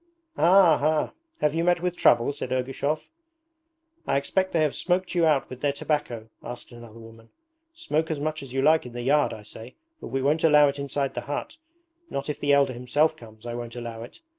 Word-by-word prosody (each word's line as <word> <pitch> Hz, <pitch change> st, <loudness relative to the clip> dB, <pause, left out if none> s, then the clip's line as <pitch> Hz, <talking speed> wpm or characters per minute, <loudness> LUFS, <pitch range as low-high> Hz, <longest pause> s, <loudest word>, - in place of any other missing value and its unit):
'Ah, 175 Hz, -3 st, +5 dB
ha! 155 Hz, +1 st, +1 dB, 0.3 s
Have 150 Hz, -1 st, +2 dB
you 165 Hz, +1 st, 0 dB
met 175 Hz, 0 st, +3 dB
with 180 Hz, 0 st, -2 dB
trouble?' 120 Hz, -5 st, +4 dB
said 135 Hz, -3 st, -6 dB
Ergushov. 135 Hz, +4 st, -2 dB, 1.0 s
'I -, -, +2 dB
expect 185 Hz, +7 st, 0 dB
they 165 Hz, -, +1 dB
have 150 Hz, -, +1 dB
smoked 185 Hz, 0 st, -1 dB
you 170 Hz, -2 st, +3 dB
out 150 Hz, -3 st, +2 dB
with 130 Hz, -1 st, -10 dB
their 145 Hz, -, +2 dB
tobacco?' 140 Hz, -6 st, -3 dB
asked 120 Hz, +1 st, -8 dB
another 120 Hz, -2 st, -12 dB
woman. 115 Hz, 0 st, -14 dB, 0.5 s
'Smoke 160 Hz, -, -1 dB
as 155 Hz, -3 st, -2 dB
much 155 Hz, +1 st, -3 dB
as 135 Hz, -3 st, -10 dB
you 135 Hz, +1 st, -1 dB
like 155 Hz, -2 st, +4 dB
in 120 Hz, -, -11 dB
the 120 Hz, 0 st, -5 dB
yard, 145 Hz, +3 st, +3 dB
I 110 Hz, -, -8 dB
say, 115 Hz, +4 st, -11 dB, 0.2 s
but -, -, -8 dB
we 135 Hz, 0 st, -2 dB
won't 150 Hz, +3 st, +1 dB
allow 150 Hz, -2 st, +6 dB
it 140 Hz, +1 st, -5 dB
inside 140 Hz, -1 st, -2 dB
the -, -, -4 dB
hut. 145 Hz, -, -5 dB, 0.5 s
Not 140 Hz, +2 st, -3 dB
if 145 Hz, -, -8 dB
the 145 Hz, -1 st, +1 dB
Elder 140 Hz, -2 st, +4 dB
himself 145 Hz, +6 st, +1 dB
comes, 110 Hz, -5 st, -15 dB
I 120 Hz, -, -4 dB
won't 120 Hz, 0 st, -6 dB
allow 115 Hz, -2 st, -6 dB
it. 120 Hz, -, -11 dB
140 Hz, 215 wpm, -25 LUFS, 120-155 Hz, 1.0 s, allow